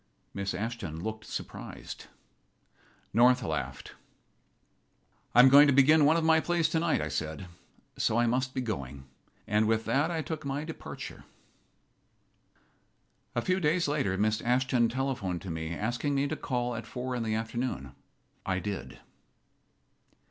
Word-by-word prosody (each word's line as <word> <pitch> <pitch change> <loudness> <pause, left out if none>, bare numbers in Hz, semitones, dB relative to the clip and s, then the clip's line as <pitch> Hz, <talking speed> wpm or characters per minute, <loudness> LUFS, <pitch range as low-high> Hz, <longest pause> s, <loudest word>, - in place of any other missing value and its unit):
Miss 100 -1 -3
Ashton 100 -6 -4
looked 110 0 -5
surprised. - - -7 1.1
North 125 +3 +5
laughed. 75 -7 -4 1.4
"I 120 - +10
am 130 - +8
going 145 +2 +8
to 140 - +4
begin 145 +3 +6
one 155 +3 +5
of 165 - 0
my 160 0 +5
plays 170 0 +1
tonight," 165 0 +1
I 75 - -2
said, 80 +5 -4 0.5
"so 110 - +2
I 120 - +4
must 130 +2 0
be 130 - 0
going." 70 - -5 0.4
And 105 +1 +2
with 110 0 +1
that 140 +8 +1
I 165 -2 -2
took 155 +2 -5
my 140 +1 -3
departure. 160 +1 -8 2.1
A 120 - 0
few 185 +1 +1
days 165 0 +2
later 140 -11 0
Miss 110 +1 +1
Ashton 125 -1 +2
telephoned 120 -9 -2
to 95 - -5
me, 80 0 -4
asking 120 - -1
me 140 +1 +1
to - - -2
call 125 -1 -2
at 115 0 -6
four 125 0 -4
in 120 - -2
the 110 -1 -1
afternoon. 110 - -3 0.5
I 95 -1 -1
did. 100 +2 -5
120 Hz, 150 wpm, -29 LUFS, 100-140 Hz, 2.1 s, I